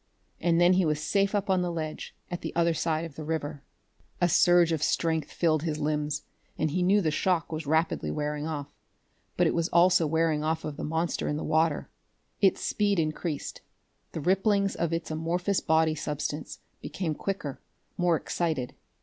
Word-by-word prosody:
And 170 0 +2
then 175 +1 +6
he 185 0 +3
was 150 -2 +1
safe 200 +6 +1
up 205 +1 0
on 190 -2 +2
the 175 -1 -1
ledge 155 -2 -5 0.2
at 175 - -4
the - - -5
other 170 0 +3
side 160 0 -1
of 165 - -9
the 155 - -6
river. 150 -2 -3 0.6
A 175 - +4
surge 175 0 +5
of 160 -3 0
strength 160 0 0
filled 155 -3 +1
his 155 -2 -2
limbs, 150 0 -1 0.3
and 155 -1 0
he 180 - 0
knew 195 +3 +4
the 160 -4 +1
shock 170 +1 0
was 155 -2 -4
rapidly 160 +2 +1
wearing 150 0 -2
off. 145 -2 -5 0.6
But - - +4
it - - +2
was 170 0 0
also 175 -1 +4
wearing 160 -1 +1
off 160 +1 -1
of 150 - -4
the - - -6
monster 160 +3 -1
in 150 - -1
the - - -4
water. 160 -1 +1 0.5
Its 195 -2 +4
speed 205 -2 +1
increased; 155 -1 -2 0.5
the 160 - -4
ripplings 195 +3 +2
of 170 -1 -1
its 165 -1 -3
amorphous 175 +5 0
body 160 0 +2
substance 150 0 -4 0.2
became 170 -5 -3
quicker, 150 -5 -4 0.3
more 175 -2 +2
excited. 155 -5 -2
160 Hz, 185 wpm, -28 LUFS, 155-175 Hz, 0.6 s, then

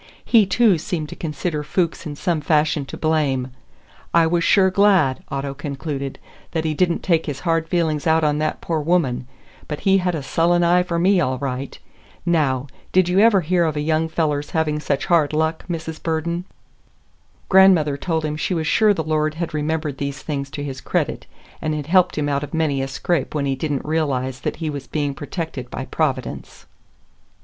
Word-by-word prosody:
He, 220 -5 +5
too, 200 -3 +3
seemed 155 -2 -3
to - - -8
consider 150 0 -3
Fuchs 170 +1 -1
in 145 - -6
some 165 +1 -1
fashion 150 -1 +1
to - - -7
blame. 140 -5 0 0.6
"I 170 -1 +6
was 170 +1 +1
sure 190 +2 +4
glad," 185 -9 +3
Otto 140 0 -3
concluded, 140 -1 -5 0.4
"that 160 -1 -1
he 155 - 0
did 175 +3 +2
n't - - -3
take 165 -3 +1
his 140 -2 -4
hard 165 -2 0
feeling 160 -4 +1
out 160 0 +3
on 150 -1 +2
that 155 0 -2
poor 165 -2 -1
woman; 150 -6 0 0.4
but 150 - -5
he 195 -1 +4
had 180 -1 0
a 150 - -4
sullen 175 +4 +2
eye 175 +1 +4
for 175 -1 -2
me, 185 +2 +3
all 130 -3 0
right! 135 0 -4 0.5
Now, 145 -7 +1 0.3
did 185 -1 +3
you 180 +2 +3
ever 210 -3 +5
hear 175 +2 +1
of 160 -2 0
a - - -1
young 160 +2 0
feller's 150 -3 -1
having 155 -2 0
such 140 -2 -1
hard 165 -5 +2
luck, 160 +1 0
Mrs. 160 -2 -5
Burden?" 170 +2 -2 1.0
Grandmother 185 -7 +5
told 160 +1 -2
him 150 0 -2
she 165 +4 -1
was 160 -1 -1
sure 210 +5 +4
the 160 - -2
Lord 155 0 0
had 170 0 -4
remembered 155 -2 -2
these 140 -1 -4
things 140 -3 -3
to 145 +1 -6
his 135 -2 -6
credit, - - -2 0.3
and 155 0 -1
had 150 -2 -4
helped 180 +2 +3
him 150 -1 0
out 140 -1 0
of 145 - -5
many 150 -4 +1
a 135 - -2
scrape 150 +3 -2
when 145 -2 0
he 135 -1 0
did 150 +3 -3
n't 140 - -2
realize 135 -5 -1
that - - -3
he 160 - -4
was 140 -2 -7
being 145 -2 -1
protected 145 -4 -5
by 135 - -5
Providence. 135 -5 -3
155 Hz, 200 wpm, -21 LUFS, 145-170 Hz, 1.0 s, I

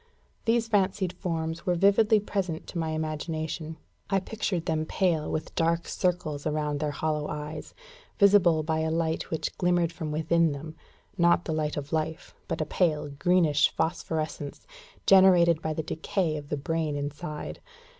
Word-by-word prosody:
These 230 0 +2
fancied 190 -3 +1
forms 165 -1 -3
were 180 - +3
vividly 200 +4 +4
present 190 -5 -3
to 170 - -5
my 160 -1 -1
imagination. 155 0 -3 0.3
I 195 -1 +3
pictured 195 -4 -3
them 155 -1 0
pale, 165 -2 0
with 155 - -3
dark 165 +1 +1
circles 160 -5 -1
around 150 -1 -1
their 150 0 -1
hollow 150 +1 -2
eyes, 150 +1 -6 0.4
visible 190 -6 +5
by 160 0 0
a 160 0 0
light 160 0 -1
which 160 - -3
glimmered 175 -1 +2
within 160 +1 +1
them; 155 +3 -8 0.4
not 170 0 +4
the 160 - -2
light 155 -1 -1
of 145 +2 -5
life, 160 +1 -2
but - - -2
a - - 0
pale, 155 -2 0
greenish 150 0 +3
phosphorescence, 160 -3 -3 0.4
generated 180 -4 +6
by 160 - -2
the 155 +1 -2
decay 165 +1 -1
of 145 -1 -7
the 150 - -1
brain 155 0 -1
inside. 150 +2 -5
160 Hz, 155 wpm, -27 LUFS, 155-175 Hz, 0.4 s, generated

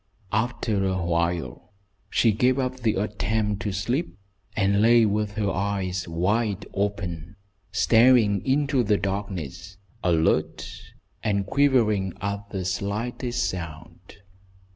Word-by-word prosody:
After 110 -2 0
awhile 85 -4 -2 0.4
she 115 - +3
gave 125 +5 +2
up 130 -1 -1
the 115 -3 +1
attempt 105 +1 -1
to 105 - -2
sleep, 100 - -2 0.4
and 100 0 +2
lay 115 +1 +6
with 105 0 0
her 105 -2 -1
eyes 95 -2 -2
wide 100 +4 0
open, 100 -4 -3 0.4
staring 110 0 +4
into 140 0 +2
the 105 -3 +2
darkness, 95 -3 -4 0.3
alert, 80 -3 +1 0.5
and 100 -3 0
quivering 110 -9 +2
at 100 +1 -4
the 95 -3 -4
slightest 105 +4 -2
sound. 85 -4 -8
100 Hz, 110 wpm, -25 LUFS, 95-110 Hz, 0.5 s, lay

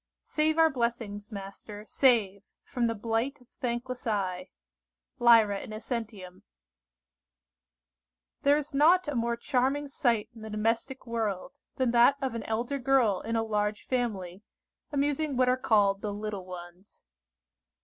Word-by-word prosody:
"Save 310 +1 0
our 325 -1 +5
blessings, 230 -4 -3
Master, 205 +1 -8
save, 220 -7 +2 0.2
From 245 -4 -1
the 230 - -1
blight 230 +6 -2
of 250 - -22
thankless 250 +1 -3
eye." 185 -4 -2 0.7
Lyra 225 -4 +5
Innocentium. 215 -4 -6 2.0
THERE 285 +1 +4
is 300 0 -5
not 325 +5 +4
a 295 - -2
more 235 -1 0
charming 270 +3 0
sight 235 -6 0
in 225 - -13
the 220 - -7
domestic 225 +5 -1
world, 230 +3 -3 0.2
than 255 -3 +1
that 240 +3 +6
of 265 -4 -2
an 230 - -3
elder 240 +5 -2
girl 245 -7 +2
in 230 +1 -3
a 225 - +1
large 210 -1 -1
family, 205 -8 -2 0.5
amusing 290 0 0
what 255 0 +4
are 250 - +4
called 205 -5 +2
the 210 - -3
little 205 -2 -5
ones. 180 +2 -11
230 Hz, 140 wpm, -29 LUFS, 210-260 Hz, 2.0 s, that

